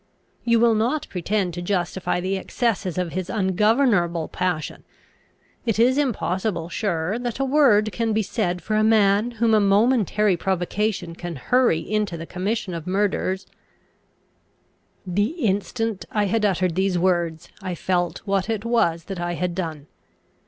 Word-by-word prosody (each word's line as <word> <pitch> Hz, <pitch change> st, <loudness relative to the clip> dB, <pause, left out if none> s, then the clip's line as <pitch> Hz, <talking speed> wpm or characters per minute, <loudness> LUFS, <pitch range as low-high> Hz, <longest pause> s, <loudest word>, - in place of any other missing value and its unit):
You 235 Hz, -1 st, +3 dB
will 235 Hz, 0 st, +5 dB
not 240 Hz, +8 st, 0 dB
pretend 185 Hz, 0 st, -1 dB
to 175 Hz, -, -5 dB
justify 180 Hz, -1 st, -1 dB
the 190 Hz, +2 st, -1 dB
excesses 195 Hz, -2 st, -1 dB
of 180 Hz, -2 st, -1 dB
his 185 Hz, +1 st, -4 dB
ungovernable 195 Hz, -, +2 dB
passion. 180 Hz, -4 st, -3 dB, 0.8 s
It 225 Hz, -4 st, 0 dB
is 245 Hz, +3 st, +4 dB
impossible, 190 Hz, -, -1 dB
sure, 185 Hz, +1 st, -1 dB
that 245 Hz, -2 st, -3 dB
a 270 Hz, -, 0 dB
word 255 Hz, -7 st, +4 dB
can 225 Hz, +4 st, -1 dB
be 220 Hz, 0 st, +1 dB
said 180 Hz, -4 st, -2 dB
for 215 Hz, -, -3 dB
a 215 Hz, -, +3 dB
man 215 Hz, 0 st, +4 dB
whom 225 Hz, 0 st, +3 dB
a 215 Hz, -, +6 dB
momentary 210 Hz, -1 st, +3 dB
provocation 190 Hz, 0 st, -1 dB
can 175 Hz, 0 st, -6 dB
hurry 235 Hz, -, +2 dB
into 210 Hz, -5 st, -2 dB
the 165 Hz, -, -6 dB
commission 190 Hz, +2 st, -3 dB
of 165 Hz, 0 st, -6 dB
murders 190 Hz, 0 st, 0 dB, 0.8 s
" -, -, -42 dB, 0.7 s
The 205 Hz, -, 0 dB
instant 210 Hz, +1 st, -1 dB
I 210 Hz, -1 st, +1 dB
had 215 Hz, +2 st, +1 dB
uttered 185 Hz, -3 st, +1 dB
these 190 Hz, +1 st, +1 dB
words, 170 Hz, -3 st, 0 dB
I 185 Hz, -2 st, -4 dB
felt 175 Hz, 0 st, -1 dB
what 195 Hz, +1 st, 0 dB
it 220 Hz, -1 st, -2 dB
was 170 Hz, -9 st, +1 dB
that 190 Hz, 0 st, -6 dB
I 175 Hz, 0 st, -2 dB
had 180 Hz, +1 st, -2 dB
done. 160 Hz, -5 st, -4 dB
195 Hz, 155 wpm, -23 LUFS, 175-220 Hz, 0.8 s, a